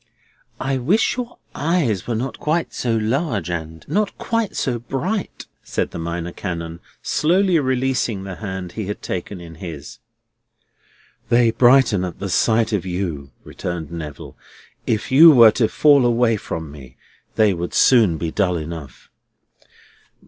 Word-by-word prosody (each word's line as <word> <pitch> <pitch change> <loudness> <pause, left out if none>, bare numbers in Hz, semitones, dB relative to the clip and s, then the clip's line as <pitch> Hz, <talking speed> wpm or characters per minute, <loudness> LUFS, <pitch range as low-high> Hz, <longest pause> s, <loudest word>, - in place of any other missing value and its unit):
"I 135 0 -1
wish 180 - +2
your 245 -1 -6 0.2
eyes 145 - 0
were 120 - -1
not 125 +1 -4
quite 160 +2 -1
so 115 -2 -1
large 110 - -1
and 80 -2 -6
not 210 0 -1
quite 230 -3 -2
so 120 -3 -1
bright," 150 - -4 0.2
said - - -3
the - - -6
Minor 85 +1 -4
Canon, 85 -3 -5 0.2
slowly 180 +2 +2
releasing 130 -6 -1
the 95 -2 -7
hand 95 -4 -6
he 105 +1 -5
had 105 - -6
taken 90 +1 -5
in 85 -1 -11
his. 80 -6 -8 1.3
"They 120 -1 +4
brighten 120 -5 +4
at 90 -2 -5
the 100 - -5
sight 110 +4 +2
of 100 - 0
you," 90 -7 -4
returned 85 -3 -6
Neville. 75 -4 -8 0.5
"If 110 +2 -1
you 160 +5 +9
were 120 -7 +8
to 110 0 +1
fall 145 0 +4
away 120 -1 +3
from 80 -7 -6
me, 65 -4 -13 0.4
they 105 -2 +4
would 85 0 -5
soon 110 -10 +5
be 80 0 -3
dull 90 -3 0
enough." 80 -4 -8
110 Hz, 150 wpm, -20 LUFS, 85-130 Hz, 1.3 s, you